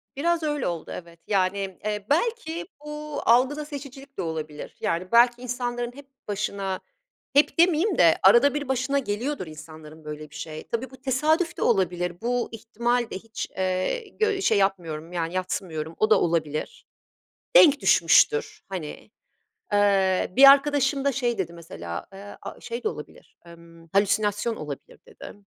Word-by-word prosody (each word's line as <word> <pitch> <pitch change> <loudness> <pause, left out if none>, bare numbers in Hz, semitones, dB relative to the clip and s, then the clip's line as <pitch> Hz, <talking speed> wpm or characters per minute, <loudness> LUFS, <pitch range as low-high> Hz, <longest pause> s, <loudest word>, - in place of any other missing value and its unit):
Biraz 335 +3 0
öyle 295 -3 -1
oldu 170 -2 -4
evet, 170 -1 -18
yani, 195 -1 0
eee, 210 -1 -2
belki 345 -1 -1 0.2
bu 300 -1 -5
algıda 265 +6 +3
seçicilik 275 -1 -10
de - - -1
olabilir, 155 -3 -5
yani, 170 +2 -1
belki 240 +1 +5
insanların 245 -1 -3
hep 285 -1 -13 0.2
başına 200 -2 -3 0.6
Hep 290 - +4
demeyeyim 350 +3 +3
de 165 -2 +5
arada 240 +9 +6
bir 290 -2 -3
başına 265 +2 +1
geliyordur 235 - -3
insanların 155 0 -12
böyle 150 0 -7
bir 150 - -16
şey. 155 0 -7
Tabii 235 +3 -3
bu 260 - -13
tesadüf 310 +7 +1
de - - -6
olabilir, 180 -3 0
bu 245 +1 -1
ihtimal 235 +2 -1
de - - -4
hiç, 225 +2 -6
ııı, 190 - -2
gö 425 -3 +1
şey 220 - +3
yapmıyorum, 170 -5 -1
yani, 170 0 -2
yadsımıyorum, 165 -4 -3
o 215 - +3
da - - +5
olabilir. 165 - -2 0.7
Denk 295 - +7
düşmüştür, 440 -1 +4
hani. 180 +1 -7 0.6
Eee, 195 -3 +2
bir 275 +1 +10
arkadaşım 280 0 +3
da 280 - +2
şey 240 -4 -1
dedi, 170 -3 -2
mesela, 85 - -7
aaa, 200 +1 -10
ııı, - - -16
şey 470 -1 -6
de - - +2
olabilir, - - -10
ımm, 165 -1 -15
"Halüsinasyon 205 +3 +1
olabilir." 145 -2 -8
dedi. - - -11
215 Hz, 155 wpm, -25 LUFS, 175-280 Hz, 0.7 s, bir